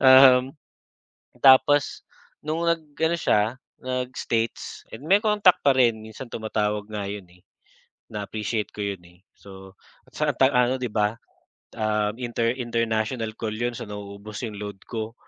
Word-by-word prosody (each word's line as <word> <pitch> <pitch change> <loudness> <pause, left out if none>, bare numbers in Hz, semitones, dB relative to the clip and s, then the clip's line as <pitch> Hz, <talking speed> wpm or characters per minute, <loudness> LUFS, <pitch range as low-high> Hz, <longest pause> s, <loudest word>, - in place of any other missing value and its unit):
Um, 130 +1 +7 0.8
tapos 135 +1 +5 0.4
no'ng 165 +3 -1
nag 165 -1 0 0.2
ano 160 +1 +2
siya, 110 -6 +1 0.3
nag-states, 125 -3 -3 0.2
may 175 +7 +5
contact 210 -4 +4
pa 140 - +6
rin, 120 -3 +4
minsan 110 +4 -9
tumatawag 105 -2 -2
nga 100 -2 -3
yun, 100 -1 -6
eh. 90 - -22 0.7
Na-appreciate 105 +1 -3
ko - - -18
yun, 100 -3 -3
eh. 90 +1 -19 0.2
So, 95 -1 -13 0.4
saan - - +1
tayo 135 0 +5
ano 125 +1 +3
'di 125 - -1
ba, 105 -1 +1 0.7
um, 105 -1 +1
inter 120 -1 0
international 115 -1 -1
call 110 -2 -2
yun. 120 +2 -1
So - - -6
nauubos 105 +1 -8
yung 105 -3 -6
load 100 -2 -7
ko 110 -1 -4
115 Hz, 140 wpm, -25 LUFS, 105-130 Hz, 0.8 s, Um